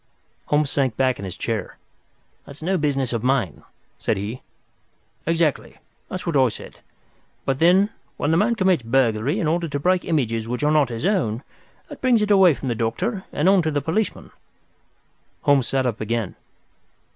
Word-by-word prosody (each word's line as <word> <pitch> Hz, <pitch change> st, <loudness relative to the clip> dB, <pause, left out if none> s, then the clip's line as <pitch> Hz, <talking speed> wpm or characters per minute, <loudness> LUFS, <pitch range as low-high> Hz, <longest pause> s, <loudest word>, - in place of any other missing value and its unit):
Holmes 150 Hz, -1 st, +1 dB
sank 130 Hz, -5 st, 0 dB
back 130 Hz, -1 st, +1 dB
in 100 Hz, -, -5 dB
his 95 Hz, -, -7 dB
chair. 110 Hz, -5 st, -3 dB, 0.7 s
"That's 140 Hz, +2 st, -10 dB
no 190 Hz, +3 st, +1 dB
business 135 Hz, -4 st, 0 dB
of 115 Hz, -, -1 dB
mine," 125 Hz, -, 0 dB, 0.4 s
said -, -, 0 dB
he. 105 Hz, +6 st, -5 dB, 0.9 s
"Exactly. 165 Hz, -4 st, 0 dB, 0.3 s
That's 185 Hz, -, -5 dB
what 170 Hz, -3 st, -1 dB
I 130 Hz, -3 st, +5 dB
said. 105 Hz, -, -11 dB, 0.7 s
But 135 Hz, 0 st, 0 dB
then, 185 Hz, +5 st, +4 dB, 0.3 s
when 145 Hz, -, 0 dB
the 165 Hz, -, +3 dB
man 235 Hz, +5 st, +2 dB
commits 185 Hz, -, +2 dB
burglary 120 Hz, -, +1 dB
in -, -, 0 dB
order 170 Hz, +2 st, 0 dB
to 145 Hz, -2 st, -3 dB
break 180 Hz, +4 st, +2 dB
images 115 Hz, -8 st, -1 dB
which 125 Hz, +4 st, -3 dB
are 150 Hz, -, +3 dB
not 150 Hz, -4 st, +3 dB
his 115 Hz, +5 st, -4 dB
own, 145 Hz, -, 0 dB, 0.4 s
that -, -, -11 dB
brings 245 Hz, -4 st, +3 dB
it 210 Hz, -, 0 dB
away 190 Hz, -6 st, +6 dB
from 135 Hz, -, -6 dB
the -, -, +1 dB
doctor 180 Hz, -, -2 dB
and 150 Hz, -, 0 dB
on 195 Hz, -1 st, +5 dB
to 160 Hz, -, 0 dB
the 145 Hz, -2 st, 0 dB
policeman." 165 Hz, -, -2 dB, 1.1 s
Holmes 140 Hz, -5 st, +3 dB
sat 135 Hz, -1 st, 0 dB
up 115 Hz, -4 st, -2 dB
again. 110 Hz, -2 st, -2 dB
145 Hz, 180 wpm, -22 LUFS, 120-175 Hz, 1.1 s, away